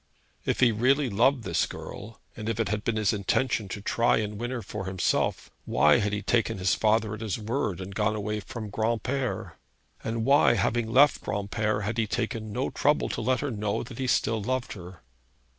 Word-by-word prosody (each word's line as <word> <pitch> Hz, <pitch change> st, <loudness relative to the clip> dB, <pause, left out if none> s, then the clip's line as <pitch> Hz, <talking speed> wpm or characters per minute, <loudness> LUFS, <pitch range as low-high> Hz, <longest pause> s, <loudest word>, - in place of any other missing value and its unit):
If -, -, 0 dB
he 125 Hz, -, +6 dB
really 130 Hz, +4 st, +2 dB
loved 120 Hz, +5 st, +3 dB
this 95 Hz, -, 0 dB
girl, 110 Hz, +2 st, -9 dB, 0.2 s
and 110 Hz, +1 st, -4 dB
if 115 Hz, 0 st, -2 dB
it 115 Hz, -, 0 dB
had 105 Hz, 0 st, -2 dB
been 115 Hz, -, 0 dB
his 110 Hz, -1 st, +2 dB
intention 105 Hz, +2 st, 0 dB
to 100 Hz, +1 st, -6 dB
try 115 Hz, +2 st, +2 dB
and 105 Hz, -1 st, -3 dB
win 120 Hz, -, -2 dB
her 125 Hz, -3 st, -4 dB
for 100 Hz, -3 st, -6 dB
himself, 95 Hz, -1 st, 0 dB
why 75 Hz, 0 st, +4 dB
had 105 Hz, 0 st, 0 dB
he 105 Hz, 0 st, -2 dB
taken 115 Hz, -4 st, +1 dB
his 90 Hz, -2 st, +2 dB
father 110 Hz, 0 st, +2 dB
at 105 Hz, -, -7 dB
his 110 Hz, -4 st, -2 dB
word 110 Hz, -4 st, -2 dB
and 95 Hz, +1 st, -7 dB
gone 110 Hz, +2 st, +1 dB
away 105 Hz, 0 st, -2 dB
from 110 Hz, 0 st, -7 dB
Granpere? 120 Hz, +5 st, -2 dB, 0.5 s
And 115 Hz, 0 st, -2 dB
why, 140 Hz, -3 st, +5 dB
having 115 Hz, -1 st, 0 dB
left 140 Hz, +4 st, +5 dB
Granpere, 105 Hz, +1 st, -1 dB
had 110 Hz, +3 st, -2 dB
he 110 Hz, -, +1 dB
taken 110 Hz, -1 st, -3 dB
no -, -, -2 dB
trouble -, -, +1 dB
to -, -, -3 dB
let 130 Hz, 0 st, +1 dB
her 145 Hz, -2 st, -2 dB
know 105 Hz, -2 st, -2 dB
that 120 Hz, -, -10 dB
he 130 Hz, -, -1 dB
still 115 Hz, -3 st, +1 dB
loved 130 Hz, +4 st, -2 dB
her? 90 Hz, -, -11 dB
110 Hz, 205 wpm, -27 LUFS, 105-120 Hz, 0.5 s, he